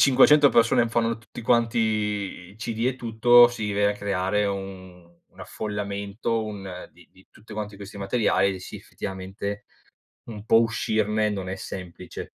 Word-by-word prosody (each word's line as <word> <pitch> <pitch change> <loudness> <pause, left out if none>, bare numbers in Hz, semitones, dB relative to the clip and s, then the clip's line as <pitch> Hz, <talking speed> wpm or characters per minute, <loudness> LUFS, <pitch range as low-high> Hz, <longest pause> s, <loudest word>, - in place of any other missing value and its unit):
500 140 +2 +6
persone 115 0 +3
fanno 115 -1 0
tutti 115 - -11
quanti 115 0 +2
i 105 -3 -2
CD 115 +1 -2
e 130 0 0
tutto, 120 +1 +6
si 110 -4 -4
viene 100 0 +2
a - - -11
creare 100 0 0
un 95 -3 -7 0.2
un - - -26
affollamento, 105 +2 -3
un 95 -4 -7
di - - -20
di 95 - -21
tutti 110 +1 -15
quanti 105 -1 -5
questi 100 +1 -10
materiali 100 -1 +1
e, - - -7
sì, - - -10
effettivamente, 95 +2 -6 0.7
un 105 -1 -8
po' 115 0 +5
uscirne 110 -1 0
non 95 -2 -4
è 95 - -4
semplice. 90 -2 -8
105 Hz, 155 wpm, -25 LUFS, 100-115 Hz, 0.7 s, 500